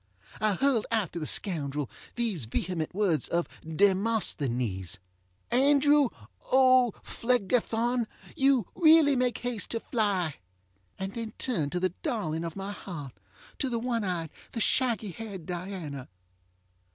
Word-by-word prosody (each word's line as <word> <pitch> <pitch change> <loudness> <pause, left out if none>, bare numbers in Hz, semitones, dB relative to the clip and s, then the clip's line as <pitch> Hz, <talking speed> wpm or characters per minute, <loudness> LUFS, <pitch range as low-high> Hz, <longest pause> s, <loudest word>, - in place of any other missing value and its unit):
I 215 -1 +2
hurled 265 -2 +2
after 205 -7 -1
the 155 - -3
scoundrel 150 -7 -1 0.3
these 220 - -1
vehement 165 +8 -3
words 185 - +2
of 170 0 0 0.2
DemosthenesŌĆö 155 - +1 0.5
Andrew 285 +1 +5 0.4
OŌĆÖPhlegethon, 245 -2 +2 0.3
you 270 -5 +3
really 315 -4 +6
make 250 -2 +1
haste 245 -4 -3
to 230 - -1
fly, 200 - 0 0.6
and 195 +1 -4
then 230 -2 -5
turned 165 - 0
to 180 - 0
the 185 +1 +1
darling 165 -8 -2
of 165 -1 -5
my 195 +1 -4
heart, 150 -10 -7 0.5
to 265 - 0
the 235 - -1
one 230 -1 -1
eyed! 175 -5 -2 0.2
the 230 - -3
shaggy 225 -3 +1
haired 195 -3 -7
Diana. 175 -7 -5
205 Hz, 125 wpm, -29 LUFS, 170-245 Hz, 0.6 s, really